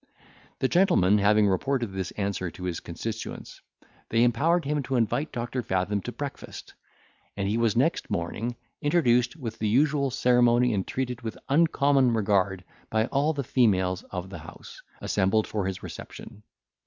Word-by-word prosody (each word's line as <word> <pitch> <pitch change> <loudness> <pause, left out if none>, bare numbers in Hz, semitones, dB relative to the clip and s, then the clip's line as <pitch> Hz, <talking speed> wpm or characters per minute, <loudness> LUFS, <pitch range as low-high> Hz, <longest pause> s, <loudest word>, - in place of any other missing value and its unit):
The 130 - +1
gentleman 105 - +4
having 105 +1 +4
reported 120 +4 0
this 95 -2 -3
answer 100 -3 -2
to 90 +3 -11
his 90 -2 -2
constituents, 110 +6 -7 0.5
they 115 +1 +3
empowered 155 +8 +2
him 150 +1 0
to 135 0 -3
invite 120 +5 0
Doctor 120 +1 -3
Fathom 100 -1 -1
to 120 - -5
breakfast, 140 +2 -7 0.6
and 100 -1 -1
he 105 - 0
was 115 -2 +1
next 135 +8 +1
morning 110 +8 -3 0.3
introduced 125 -6 +2
with 115 -8 -7
the 110 - 0
usual 140 +3 +2
ceremony, 125 -1 +3
and 95 -2 -1
treated 125 -2 -3
with 115 -2 -5
uncommon 140 -5 +3
regard 100 -3 +1 0.3
by 110 0 +1
all 145 +3 +2
the 140 -2 -3
females 95 -8 +2
of 95 0 -6
the - - -7
house, - - -12 0.2
assembled 95 +3 +1
for 100 -3 -2
his 95 - -5
reception. 105 - -9
115 Hz, 155 wpm, -26 LUFS, 100-135 Hz, 0.6 s, gentleman